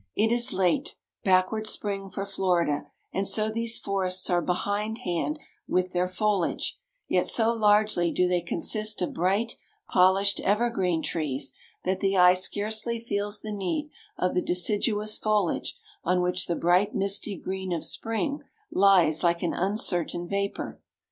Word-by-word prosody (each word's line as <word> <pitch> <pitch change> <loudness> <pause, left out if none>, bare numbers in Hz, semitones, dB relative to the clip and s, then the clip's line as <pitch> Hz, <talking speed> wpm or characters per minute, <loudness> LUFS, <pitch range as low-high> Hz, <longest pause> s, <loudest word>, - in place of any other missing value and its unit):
It 220 +2 +2
is 240 +1 +3
a - - -4
late, 260 - +1 0.3
backward 190 +3 +2
spring 195 -2 -2
for 195 +1 -4
Florida; 175 -7 0 0.3
and 195 0 0
so 215 +2 +2
these 230 0 +1
forests 190 -2 -1
are 175 0 +3
behindhand 205 - -2 0.3
with 185 0 0
their 180 0 +1
foliage: 195 0 -1 0.3
yet - - +1
so 230 0 +3
largely 210 -5 +3
do 180 - +2
they 180 -1 +1
consist 215 +4 0
of - - -3
bright 195 +7 0 0.3
polished 190 +2 +4
evergreen 195 -6 +1
trees, 135 -5 -2 0.3
that 185 +1 0
the 195 -1 +1
eye 180 0 +7
scarcely 215 +5 0
feels 205 -2 -2
the 215 - -6
need 210 - -3 0.3
of 180 - 0
the 180 - +1
deciduous 210 +4 0
foliage 210 -5 0 0.3
on 180 +1 +2
which 180 0 0
the 170 - 0
bright 180 +5 +2
misty 200 0 0
green 190 +1 -5
of 170 -2 -1
spring 280 +6 -1 0.3
lies 185 -5 +4
like 170 0 +2
an 175 - 0
uncertain 175 -3 -1
vapor. 200 +1 -3
195 Hz, 150 wpm, -27 LUFS, 180-215 Hz, 0.3 s, eye